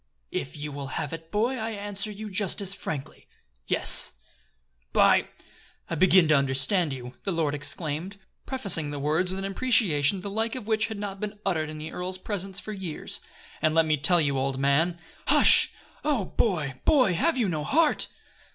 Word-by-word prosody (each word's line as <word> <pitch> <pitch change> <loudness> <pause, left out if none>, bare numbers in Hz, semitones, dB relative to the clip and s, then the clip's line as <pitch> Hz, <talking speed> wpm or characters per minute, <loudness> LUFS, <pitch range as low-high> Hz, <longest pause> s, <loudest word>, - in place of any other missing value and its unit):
"If 140 - -5
you 150 0 -6
will 140 -1 -6
have 145 - -4
it, 165 0 -8
boy, 235 +5 0
I 220 +1 -3
answer 205 -1 -3
you 210 0 -8
just 195 -1 -1
as 195 -1 -1
frankly, 150 -8 -7 0.4
yes." - - +8 0.8
"By! - - +4 0.6
I - - -1
begin 185 +1 +4
to 155 - +5
understand 140 +5 +1
you!" 125 -1 -7
the - - -3
young 175 - -2
lord 155 -3 0
exclaimed, 155 +5 -3 0.3
prefacing 195 - +1
the 145 - -5
words 155 +6 0
with 190 - -4
an 195 - -4
imprecation 195 - +1
the 200 - -6
like 225 +3 -1
of 250 -5 -6
which 220 0 0
had 220 -2 -6
not 200 -1 -6
been 210 0 -5
uttered 160 -5 -1
in 155 - -7
the 155 +1 -7
earl's 180 +1 -4
presence 195 0 -4
for 215 - -7
years. 185 -6 -5 0.4
"And 155 0 +1
let 165 0 +4
me 155 -1 +2
tell 165 +5 +2
you, 140 -4 0
old 135 0 -2
man 145 +6 +1
" - - -27
"Hush! - - +5 0.3
Oh, 275 -10 0
boy! 155 - -2
boy! 255 -11 +3
have 290 - +1
you 235 -5 +1
no 155 -5 -2
heart?" 310 - +2
180 Hz, 190 wpm, -26 LUFS, 150-205 Hz, 0.8 s, yes